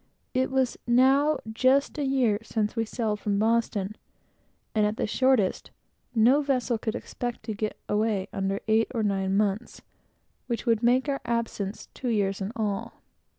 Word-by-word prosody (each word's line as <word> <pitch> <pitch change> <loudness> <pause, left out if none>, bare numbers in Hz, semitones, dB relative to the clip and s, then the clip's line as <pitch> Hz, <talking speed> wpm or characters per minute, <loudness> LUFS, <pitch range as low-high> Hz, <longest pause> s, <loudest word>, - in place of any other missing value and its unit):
It 260 0 +1
was 265 -1 0
now 270 +5 +4 0.2
just 265 +6 +2
a - - 0
year 255 -6 +2
since 220 -1 -2
we 225 -1 0
sailed 215 -2 -2
from 205 -1 -1
Boston, 215 -2 +1 0.8
and 215 - +2
at 210 +1 0
the - - 0
shortest, 235 -2 +1 0.5
no 245 +6 +5
vessel 255 -5 0
could 220 0 -2
expect 240 -1 -5
to 220 - -4
get 215 +1 -3
away 210 -2 0
under 195 0 -1
eight 220 +1 +3
or 225 - 0
nine 195 -1 0
months, 210 +2 -1 0.6
which 235 -1 -3
would 230 -2 +2
make 250 +4 +3
our 275 -1 -1
absence 230 -4 -3
two 255 - -4
years 200 -3 0
in 195 +2 -3
all. 210 -3 -3
225 Hz, 160 wpm, -27 LUFS, 210-255 Hz, 0.8 s, no